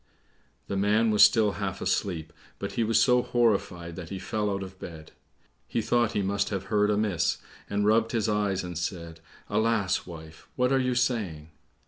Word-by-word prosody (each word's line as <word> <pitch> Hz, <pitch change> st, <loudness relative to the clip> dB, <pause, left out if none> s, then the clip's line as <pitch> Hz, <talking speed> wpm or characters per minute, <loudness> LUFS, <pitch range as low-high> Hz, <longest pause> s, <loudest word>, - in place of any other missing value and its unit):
The -, -, -4 dB
man 105 Hz, +3 st, +2 dB
was 105 Hz, -, +3 dB
still 110 Hz, -2 st, +6 dB
half 100 Hz, -2 st, -3 dB
asleep, 85 Hz, -5 st, -2 dB, 0.2 s
but 100 Hz, -, -5 dB
he 115 Hz, +4 st, 0 dB
was 115 Hz, +1 st, +3 dB
so 125 Hz, -1 st, +4 dB
horrified 100 Hz, -9 st, 0 dB
that 85 Hz, -3 st, -7 dB
he 95 Hz, -, -5 dB
fell 105 Hz, +3 st, -2 dB
out 100 Hz, -1 st, -2 dB
of 95 Hz, 0 st, -11 dB
bed. 80 Hz, -3 st, -9 dB, 0.6 s
He -, -, -1 dB
thought 120 Hz, 0 st, +1 dB
he 100 Hz, -, 0 dB
must 100 Hz, +1 st, 0 dB
have 95 Hz, -2 st, -3 dB
heard 105 Hz, 0 st, +3 dB
amiss, 105 Hz, -4 st, +1 dB, 0.3 s
and 100 Hz, 0 st, 0 dB
rubbed 110 Hz, +1 st, +3 dB
his 115 Hz, -3 st, 0 dB
eyes, 105 Hz, -3 st, 0 dB
and 90 Hz, -1 st, -6 dB
said, 85 Hz, -2 st, -5 dB, 0.3 s
"Alas, 110 Hz, -3 st, 0 dB
wife, 80 Hz, -2 st, -11 dB
what 125 Hz, 0 st, +1 dB
are 135 Hz, -, +3 dB
you 125 Hz, -1 st, 0 dB
saying?" 105 Hz, -12 st, -1 dB
100 Hz, 180 wpm, -27 LUFS, 90-110 Hz, 0.6 s, still